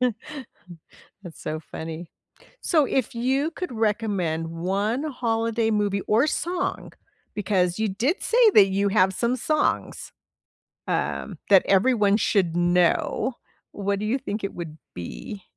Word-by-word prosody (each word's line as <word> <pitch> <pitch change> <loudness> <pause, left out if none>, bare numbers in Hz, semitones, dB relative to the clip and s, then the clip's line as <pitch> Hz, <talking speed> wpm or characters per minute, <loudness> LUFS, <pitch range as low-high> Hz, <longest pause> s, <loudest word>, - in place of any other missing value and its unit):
That's 220 - -7
so 155 +1 -4
funny. 160 +1 -8 0.5
So, 310 -5 +3
if 260 -3 -1
you 265 +6 0
could 360 -5 -5
recommend 205 -8 -1
1 200 - -1
holiday 230 -5 0
movie, 205 -2 0
or 230 +7 +3
song, 355 +3 -2 0.4
because 185 -2 0
you 220 - +1
did 245 - -1
say 470 -1 +5
that 200 - +8
you 200 +1 +1
have 190 -2 +3
some 235 +5 0
songs, 305 +4 -1 0.8
um, - - -2
that 195 -2 +7
everyone 205 0 +3
should 190 -6 +1
know, 175 +8 +2 0.4
what 200 0 -2
do 210 - -3
you 235 +6 +1
think 210 -4 -5
it 195 - -3
would 160 -3 -7 0.2
be? 85 - -8
210 Hz, 130 wpm, -24 LUFS, 180-245 Hz, 0.8 s, that